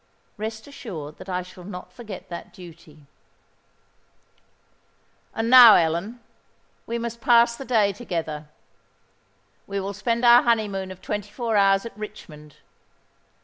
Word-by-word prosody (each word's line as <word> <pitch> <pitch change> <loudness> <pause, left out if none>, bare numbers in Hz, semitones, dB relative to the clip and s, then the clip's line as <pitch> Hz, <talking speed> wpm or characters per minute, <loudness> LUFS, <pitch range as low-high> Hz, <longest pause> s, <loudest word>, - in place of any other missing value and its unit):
"Rest 220 +1 -6
assured 170 - -9
that 190 - -11
I 180 0 -2
shall 180 0 -14
not 180 -1 -9
forget 215 -6 -9
that 170 - -8
duty." 165 -5 -15 2.3
"And 225 0 -1
now, 245 -2 +10
Ellen, 170 +8 0 0.7
we 235 - -2
must 235 0 -6
pass 235 0 +4
the 270 - -9
day 215 -6 +2
together. 165 -8 -5 1.2
We 200 0 -3
will 195 +1 -4
spend 230 +4 -1
our 240 +1 +8
honeymoon 205 -5 0
of 185 0 -11
twenty 205 -1 -4
four 230 +1 -3
hours 195 0 +3
at 230 - -9
Richmond. 155 -8 -11
205 Hz, 130 wpm, -24 LUFS, 180-235 Hz, 2.3 s, now